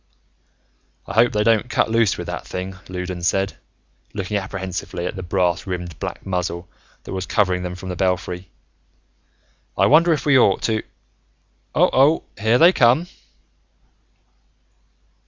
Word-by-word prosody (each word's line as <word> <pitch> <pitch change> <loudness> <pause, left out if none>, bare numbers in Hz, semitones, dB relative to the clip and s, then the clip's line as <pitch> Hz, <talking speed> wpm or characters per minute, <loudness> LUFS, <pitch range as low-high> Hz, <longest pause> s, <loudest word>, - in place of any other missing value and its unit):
"I - - -7
hope 115 +2 +4
they 105 0 +1
don't 115 +2 +2
cut 110 - +1
loose 115 -3 +2
with - - -5
that - - -6
thing," 95 +1 -5
Loudons 90 -1 -3
said, 95 +1 0 0.6
looking 100 0 -3
apprehensively 95 -3 -4
at 90 - -3
the 95 - -5
brass 90 0 0
rimmed 90 -4 -5
black - - -6
muzzle 90 -2 -3 0.4
that - - -8
was 95 -1 -4
covering 90 -4 +1
them 90 0 -5
from 95 +1 -8
the 90 - -3
belfry. 90 0 -2 1.3
"I - - +4
wonder 165 +4 +5
if 155 - 0
we 140 -3 +5
ought 100 -5 +3
to 110 -1 0 0.9
Oh - - +4
oh, 140 +5 +4
here 110 +4 +2
they 170 +7 +7
come!" 125 +6 +4
95 Hz, 145 wpm, -21 LUFS, 90-115 Hz, 1.3 s, they